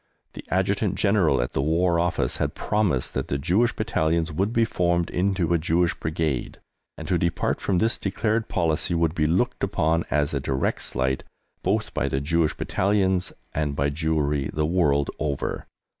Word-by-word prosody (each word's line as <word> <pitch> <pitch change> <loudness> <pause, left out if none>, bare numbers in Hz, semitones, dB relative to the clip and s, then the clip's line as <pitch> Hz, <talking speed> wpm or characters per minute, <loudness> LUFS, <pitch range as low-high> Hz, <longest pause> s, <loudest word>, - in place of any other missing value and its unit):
The - - -8
Adjutant - - +1
General 100 - +3
at - - -6
the - - 0
War 85 +3 +2
Office 85 0 0
had - - -2
promised 100 -12 0
that - - -2
the 70 - -1
Jewish 95 - +1
Battalions 80 -5 0
would 95 +8 0
be 115 -1 +3
formed 85 -4 0
into 90 -2 +1
a 85 - +3
Jewish 85 +2 +1
Brigade, 80 -4 -2 0.4
and - - -7
to 90 -2 +1
depart 85 0 0
from 95 - +1
this 110 +5 +1
declared 110 +3 -1
policy 85 0 0
would 85 -1 +1
be 75 -3 +1
looked 120 +10 0
upon 85 -4 +1
as 75 -1 +1
a - - 0
direct 65 0 -1
slight, 65 +1 -1 0.4
both 105 +3 -1
by 70 - 0
the 65 - 0
Jewish 80 +2 +1
Battalions 95 -2 +1 0.2
and 75 -2 -1
by 70 +1 0
Jewry 75 -2 0
the 75 0 0
world 75 -4 +2
over. 70 -3 -2
85 Hz, 175 wpm, -25 LUFS, 75-95 Hz, 0.4 s, General